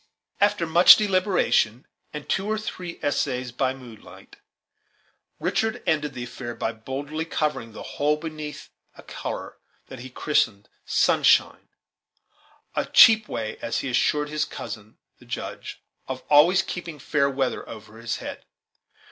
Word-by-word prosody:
After 205 Hz, -3 st, +2 dB
much 170 Hz, +2 st, +8 dB
deliberation 185 Hz, -, +1 dB, 0.3 s
and 150 Hz, -1 st, -8 dB
two 195 Hz, +2 st, -1 dB
or 215 Hz, 0 st, 0 dB
three 180 Hz, -5 st, -6 dB
essays 130 Hz, -3 st, -1 dB
by 130 Hz, +2 st, -1 dB
moonlight, 120 Hz, -5 st, -14 dB, 1.0 s
Richard 220 Hz, 0 st, -1 dB
ended 150 Hz, -3 st, 0 dB
the 125 Hz, -, -5 dB
affair 120 Hz, 0 st, -7 dB
by 110 Hz, -, -2 dB
boldly 135 Hz, +7 st, -5 dB
covering 150 Hz, -8 st, -2 dB
the -, -, -8 dB
whole 150 Hz, +1 st, 0 dB
beneath 155 Hz, -1 st, -7 dB, 0.3 s
a -, -, -13 dB
color -, -, -6 dB, 0.3 s
that 130 Hz, -, -9 dB
he 130 Hz, +2 st, -9 dB
christened 115 Hz, -6 st, 0 dB, 0.2 s
"sunshine," -, -, +3 dB, 1.1 s
a -, -, -1 dB
cheap 220 Hz, -1 st, +7 dB
way, 110 Hz, -1 st, -4 dB
as 115 Hz, -, -2 dB
he 135 Hz, -, -4 dB
assured 150 Hz, +4 st, +1 dB
his 155 Hz, 0 st, -1 dB
cousin 110 Hz, -7 st, -8 dB, 0.2 s
the -, -, -17 dB
Judge, -, -, -7 dB, 0.2 s
of 130 Hz, -1 st, -5 dB
always 175 Hz, +6 st, +6 dB
keeping 170 Hz, -3 st, -6 dB
fair 140 Hz, 0 st, +1 dB
weather 135 Hz, -1 st, -2 dB
over 110 Hz, 0 st, -11 dB
his 115 Hz, 0 st, -3 dB
head. -, -, -8 dB
145 Hz, 140 wpm, -24 LUFS, 125-165 Hz, 1.1 s, much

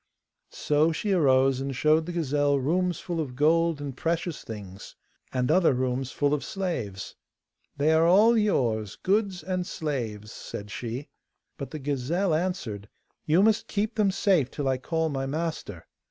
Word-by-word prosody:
So 150 Hz, +2 st, +1 dB
she 200 Hz, +6 st, -2 dB
arose 135 Hz, -6 st, +3 dB
and 135 Hz, -1 st, -3 dB
showed 155 Hz, +4 st, +3 dB
the -, -, -3 dB
gazelle 145 Hz, -4 st, +1 dB
rooms 175 Hz, +6 st, 0 dB
full 170 Hz, -2 st, -4 dB
of 135 Hz, -6 st, -4 dB
gold 165 Hz, +2 st, +2 dB
and 140 Hz, -3 st, -5 dB
precious 165 Hz, 0 st, -2 dB
things, 100 Hz, -3 st, -9 dB, 0.4 s
and 125 Hz, +1 st, 0 dB
other 165 Hz, -5 st, +4 dB
rooms 130 Hz, +1 st, -1 dB
full 145 Hz, 0 st, +1 dB
of 150 Hz, -, -1 dB
slaves. 125 Hz, -, -4 dB, 0.6 s
'They 150 Hz, +3 st, +3 dB
are 160 Hz, +1 st, +4 dB
all 210 Hz, +7 st, +6 dB
yours, 115 Hz, -, +1 dB
goods 195 Hz, -3 st, 0 dB
and 185 Hz, 0 st, -2 dB
slaves,' 115 Hz, -9 st, -4 dB
said 105 Hz, 0 st, -8 dB
she. 120 Hz, +6 st, -5 dB, 0.5 s
But 140 Hz, -, -6 dB
the 155 Hz, -, -6 dB
gazelle 150 Hz, +6 st, -1 dB
answered, 155 Hz, -, -2 dB, 0.4 s
'You 165 Hz, +5 st, +4 dB
must 220 Hz, 0 st, +2 dB
keep 210 Hz, +2 st, -1 dB
them 210 Hz, -3 st, +2 dB
safe 185 Hz, -, +2 dB
till 145 Hz, -2 st, -3 dB
I 130 Hz, -1 st, +1 dB
call 160 Hz, +4 st, -1 dB
my 135 Hz, -2 st, -2 dB
master. 150 Hz, -, -4 dB
150 Hz, 160 wpm, -27 LUFS, 130-175 Hz, 0.6 s, all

